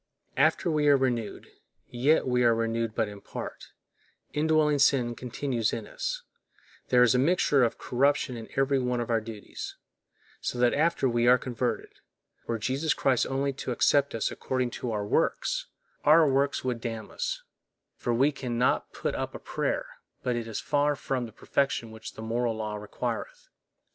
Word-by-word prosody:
After 175 - +3
we 150 -1 +2
are 145 -1 +7
renewed, 120 -5 -1 0.4
yet 135 +5 +2
we 125 -1 +2
are 115 -1 +5
renewed 115 0 -1
but 115 -2 +1
in 100 -1 -9
part, - - -7 0.7
indwelling 150 -1 +3
sin 130 -4 +3
continues 120 -1 -2
in 115 -2 -3
us, - - -4 0.7
there 125 -1 +6
is 115 - +5
a 125 - +3
mixture 145 -2 +3
of 115 - +1
corruption 140 +1 +1
in 115 -1 -8
every 135 0 +2
one 125 -1 0
of 120 0 -2
our 115 -1 +2
duties; 110 -2 -8 0.6
so - - -3
that 120 0 +3
after 160 -2 +2
we 120 -1 +2
are 125 +1 +7
converted, 125 -1 -3 0.5
were 115 - -1
Jesus 135 +7 0
Christ 130 -3 +2
only 135 +1 -1
to 130 - -5
accept 140 +3 +3
us 115 - 0
according 130 -2 -2
to 125 - -4
our 105 -2 -2
works, - - 0 0.4
our 155 +1 +6
works 140 +1 +1
would 125 -3 -2
damn 115 -2 -5
us, - - -3 0.5
for 120 - -2
we 135 +5 +3
can 125 -4 -4
not 125 - +1
put - - -2
up - - -4
a - - -6
prayer - - -2 0.4
but 125 -1 0
it 115 -1 -3
is 110 - -4
far 145 0 +1
from 130 -3 -2
that 110 - -15
perfection 135 -5 -1
which 110 0 -9
the 110 - -8
moral 115 +1 0
law 110 -1 -3
requireth. - - -5
125 Hz, 175 wpm, -28 LUFS, 115-140 Hz, 0.7 s, are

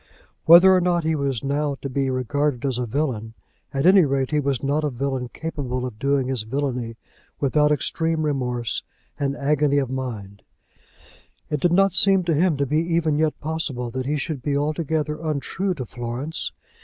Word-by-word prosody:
Whether 175 +3 +9
or 185 - +3
no 175 0 +2
he 160 -1 0
was 140 -5 -1
now 140 +1 -1
to - - -2
be 135 0 -1
regarded 130 +1 -1
as 130 -3 -1
a 125 - -2
villain, 115 -4 -2 0.4
at 135 +1 -1
any 190 0 +7
rate 135 -2 0
he 150 - +2
was 140 -3 -1
not 145 +3 0
a 150 - +1
villain 130 -1 -3
capable 130 -6 -4
of 115 -4 -7
doing 140 -1 +1
his 130 -3 -1
villany 125 -1 -3 0.4
without 150 +2 +2
extreme 160 +2 0
remorse 125 -5 -1 0.4
and 140 0 -1
agony 145 0 +2
of 135 -3 0
mind. 110 -7 -5 1.1
It 150 - 0
did 175 +4 +2
not 195 +1 +4
seem 195 -2 +4
to 170 -1 +1
him 160 0 +2
to 140 - +1
be 150 +3 0
even 165 -2 +1
yet 155 -1 0
possible 145 -6 -3
that 130 +1 -4
he 150 +1 0
should 145 -1 -4
be 140 +1 0
altogether 150 +1 -1
untrue 165 +5 -2
to 130 -5 -5
Florence. 120 +7 -4
140 Hz, 180 wpm, -23 LUFS, 130-155 Hz, 1.1 s, Whether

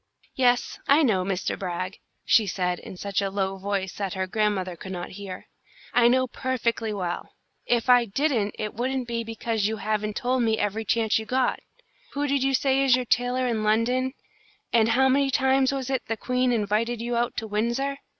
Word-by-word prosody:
"Yes, 245 -2 +1
I 290 +3 +5
know, 205 -9 +2
Mr. 190 -1 -2
Brag," 185 0 -4 0.3
she 220 -4 +4
said, 180 -1 -1
in 185 - -10
such 200 +1 -1
a 195 - -1
low 195 0 -2
voice 195 -1 -2
that 195 -2 -3
her 190 0 -1
grandmother 190 -2 -1
could 190 +2 -9
not 175 -1 -5
hear. 190 -1 -8 0.5
"I 240 -1 +5
know 255 +1 +3
perfectly 235 -3 -2
well. 180 -4 -4 0.3
If 240 0 +1
I 245 -1 +6
didn't 230 -2 0
it 210 - -4
wouldn't 255 +2 -2
be 230 -1 -2
because 225 -2 -1
you 220 0 -2
haven't 215 0 -2
told 255 0 0
me 220 -2 +2
every 210 +2 -1
chance 220 +1 +2
you 220 - -7
got. 255 +1 +1 0.5
Who 285 +1 -1
did 280 -1 +1
you 270 0 +2
say 270 +1 +2
is 260 -3 +5
your 250 0 -2
tailor 245 +2 +1
in 230 -3 0
London, 245 +5 +1 0.6
and 230 -1 +4
how 260 +4 +4
many 275 +1 +3
times 265 0 +3
was 270 -1 -3
it 260 -2 0
the 225 - -2
Queen 250 +3 0
invited 225 +1 0
you 240 +1 -2
out 240 +1 -1
to 225 - -2
Windsor? 235 +6 -1
230 Hz, 195 wpm, -25 LUFS, 205-255 Hz, 0.6 s, I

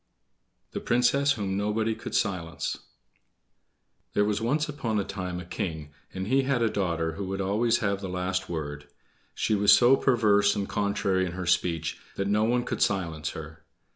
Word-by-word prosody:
The - - -3
Princess 125 +4 +3
Whom 100 -6 -3
Nobody 105 +2 0
Could - - -6
Silence 90 -7 -1 1.4
There 105 - +3
was 105 +1 0
once 150 +7 +1
upon 115 -7 -2
a - - 0
time 90 -2 -5
a 90 - -8
king, 80 -4 -4 0.2
and 95 0 -4
he 130 +6 +3
had 135 -3 +1
a 110 - +2
daughter 85 -4 -1
who 100 +5 -5
would 95 +1 -3
always 110 +5 +2
have 100 0 0
the 95 - -4
last 90 +1 -2
word; 75 -3 -5 0.5
she - - 0
was 105 0 +5
so 125 +2 +7
perverse 105 -6 +3
and 100 -1 -2
contrary 100 -2 0
in 85 - -6
her 90 0 -4
speech 85 -2 0 0.2
that 100 - -1
no 105 +2 +2
one 120 +1 +1
could - - -4
silence 80 -6 0
her. 80 0 -9
100 Hz, 175 wpm, -27 LUFS, 90-110 Hz, 1.4 s, so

